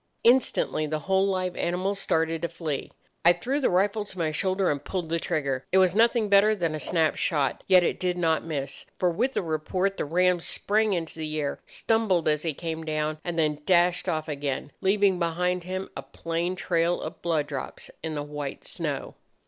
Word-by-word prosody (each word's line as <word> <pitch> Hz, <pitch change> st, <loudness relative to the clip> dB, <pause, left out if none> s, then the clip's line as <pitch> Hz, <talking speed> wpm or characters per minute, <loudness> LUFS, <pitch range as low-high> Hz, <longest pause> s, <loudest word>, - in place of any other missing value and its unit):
Instantly 235 Hz, -10 st, +3 dB
the 155 Hz, 0 st, -2 dB
whole 190 Hz, +3 st, +2 dB
live 185 Hz, -2 st, -1 dB
animals 185 Hz, +3 st, -1 dB
started 165 Hz, -3 st, 0 dB
to 170 Hz, -, 0 dB
flee. 165 Hz, -4 st, -4 dB, 0.3 s
I 175 Hz, -, +7 dB
threw 255 Hz, +11 st, -2 dB
the 275 Hz, -, +2 dB
rifle 200 Hz, +4 st, +2 dB
to 190 Hz, -, -11 dB
my 160 Hz, -3 st, 0 dB
shoulder 185 Hz, +4 st, +1 dB
and 145 Hz, -1 st, -3 dB
pulled 180 Hz, -4 st, -3 dB
the 165 Hz, 0 st, 0 dB
trigger. 135 Hz, -5 st, -1 dB
It 190 Hz, -, +4 dB
was 185 Hz, -2 st, +5 dB
nothing 230 Hz, +1 st, +3 dB
better 205 Hz, +2 st, +5 dB
than 170 Hz, -5 st, -1 dB
a 155 Hz, -, -3 dB
snap 160 Hz, 0 st, +1 dB
shot, 145 Hz, -5 st, 0 dB
yet 185 Hz, -1 st, +6 dB
it -, -, 0 dB
did 180 Hz, -1 st, 0 dB
not 160 Hz, -2 st, +1 dB
miss; 145 Hz, -4 st, -4 dB
for 180 Hz, -1 st, +2 dB
with 250 Hz, +10 st, 0 dB
the -, -, -1 dB
report 180 Hz, +5 st, -1 dB
the -, -, -1 dB
ram 180 Hz, +3 st, +2 dB
sprang 210 Hz, +5 st, +1 dB
into 165 Hz, -2 st, -3 dB
the 155 Hz, 0 st, -3 dB
air, 140 Hz, -1 st, -2 dB
stumbled 215 Hz, -7 st, +1 dB
as 150 Hz, -1 st, +2 dB
he 160 Hz, -3 st, -2 dB
came 160 Hz, 0 st, -4 dB
down, 155 Hz, 0 st, -2 dB
and 175 Hz, -1 st, -3 dB
then 150 Hz, -2 st, +1 dB
dashed 180 Hz, -1 st, +3 dB
off 155 Hz, 0 st, -1 dB
again, 140 Hz, -1 st, -3 dB
leaving 195 Hz, -1 st, +3 dB
behind 180 Hz, +1 st, 0 dB
him 185 Hz, +1 st, -4 dB
a -, -, -4 dB
plain 165 Hz, +6 st, -3 dB
trail 175 Hz, -1 st, +1 dB
of -, -, -7 dB
blood 160 Hz, -4 st, +1 dB
drops 140 Hz, -2 st, -6 dB
on 160 Hz, -1 st, -3 dB
the 145 Hz, -, -2 dB
white 145 Hz, -1 st, -6 dB
snow. -, -, -3 dB
170 Hz, 200 wpm, -26 LUFS, 155-190 Hz, 0.3 s, I